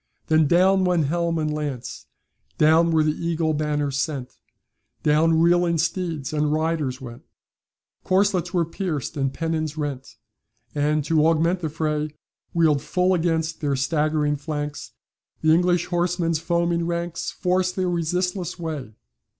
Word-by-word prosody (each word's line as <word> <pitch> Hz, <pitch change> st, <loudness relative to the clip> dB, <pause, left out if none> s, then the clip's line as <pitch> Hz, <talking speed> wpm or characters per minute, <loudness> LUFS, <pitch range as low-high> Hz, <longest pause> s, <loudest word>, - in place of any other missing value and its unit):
Then 155 Hz, -1 st, +4 dB
down 185 Hz, +4 st, +4 dB
went 175 Hz, -4 st, +2 dB
helm 170 Hz, +2 st, 0 dB
and 155 Hz, -1 st, -1 dB
lance, 145 Hz, -5 st, -5 dB, 0.5 s
Down 160 Hz, +2 st, +5 dB
were 160 Hz, -1 st, +3 dB
the 155 Hz, -, +2 dB
eagle 165 Hz, -1 st, -1 dB
banners 145 Hz, -2 st, -1 dB
sent, 140 Hz, -5 st, -3 dB, 0.7 s
Down 160 Hz, +2 st, +3 dB
reeling 170 Hz, 0 st, +3 dB
steeds 165 Hz, -3 st, -2 dB
and 150 Hz, -1 st, +1 dB
riders 155 Hz, -4 st, -1 dB
went, 120 Hz, -3 st, -9 dB, 0.8 s
Corslets 190 Hz, -2 st, +1 dB
were 175 Hz, -3 st, +1 dB
pierced, 165 Hz, -, -4 dB
and 135 Hz, -2 st, 0 dB
pennons 160 Hz, 0 st, -2 dB
rent; 140 Hz, -4 st, -5 dB, 0.6 s
And, 150 Hz, 0 st, +1 dB
to 155 Hz, 0 st, +3 dB
augment 165 Hz, +3 st, +2 dB
the 160 Hz, -3 st, -3 dB
fray, 150 Hz, -1 st, -2 dB, 0.4 s
Wheeled 155 Hz, -4 st, +3 dB
full 180 Hz, +5 st, +1 dB
against 165 Hz, -2 st, 0 dB
their 145 Hz, -2 st, 0 dB
staggering 150 Hz, +1 st, 0 dB
flanks, 145 Hz, 0 st, -5 dB, 0.5 s
The 155 Hz, 0 st, +4 dB
English 175 Hz, 0 st, +2 dB
horsemen's 175 Hz, -2 st, 0 dB
foaming 170 Hz, 0 st, 0 dB
ranks 170 Hz, 0 st, -3 dB
Forced 185 Hz, 0 st, 0 dB
their 185 Hz, -1 st, 0 dB
resistless 180 Hz, +1 st, -1 dB
way. 155 Hz, -, -5 dB
160 Hz, 135 wpm, -23 LUFS, 150-170 Hz, 0.8 s, Down